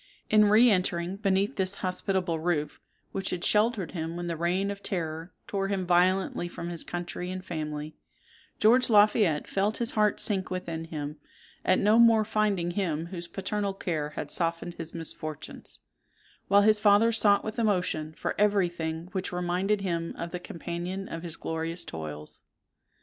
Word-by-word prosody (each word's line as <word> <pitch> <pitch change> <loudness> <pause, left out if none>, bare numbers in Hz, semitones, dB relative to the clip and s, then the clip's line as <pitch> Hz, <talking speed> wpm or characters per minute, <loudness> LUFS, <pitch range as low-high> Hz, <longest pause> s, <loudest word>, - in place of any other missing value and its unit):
In 215 -1 +6
re 215 +4 +6
entering 180 -1 0
beneath 200 +3 +1
this 190 0 +1
hospitable 185 -2 0
roof, 155 -3 -1 0.3
which 195 0 -2
had 180 -1 -3
sheltered 210 -4 +2
him 165 -1 -4
when 175 0 -4
the 170 -1 -2
reign 180 +4 0
of 200 0 -7
terror 165 -3 -4
tore 195 -1 -2
him 195 -2 -1
violently 180 0 +2
from 175 0 -6
his 170 -2 -2
country 175 +1 -5
and 185 0 -6
family, 155 -2 -5 0.6
George 245 +4 +5
Lafayette 205 -7 +4
felt 205 +2 0
his 235 -1 -2
heart 210 -1 +2
sink 195 -3 +1
within 170 -3 -4
him, 150 -2 -5 0.5
at 185 - +3
no 215 +3 +4
more 225 -2 +6
finding 205 -5 0
him 170 -4 -1
whose 170 -1 -4
paternal 200 +1 -2
care 155 -6 -2
had - - -5
softened 170 0 -1
his 165 -1 -7
misfortunes; 155 -2 -4 0.7
while 200 0 +5
his 215 0 +5
father 210 +2 +5
sought 205 -3 +4
with 215 +2 -4
emotion 180 -7 0
for - - -2
every 205 -3 +3
thing 160 0 -4
which 190 -1 -3
reminded 180 +3 0
him 170 -3 -2
of 170 0 -5
the 180 - -4
companion 175 +3 -5
of 165 - -6
his 170 -2 -3
glorious 165 +1 -3
toils. 75 -1 -7
180 Hz, 165 wpm, -28 LUFS, 165-200 Hz, 0.7 s, In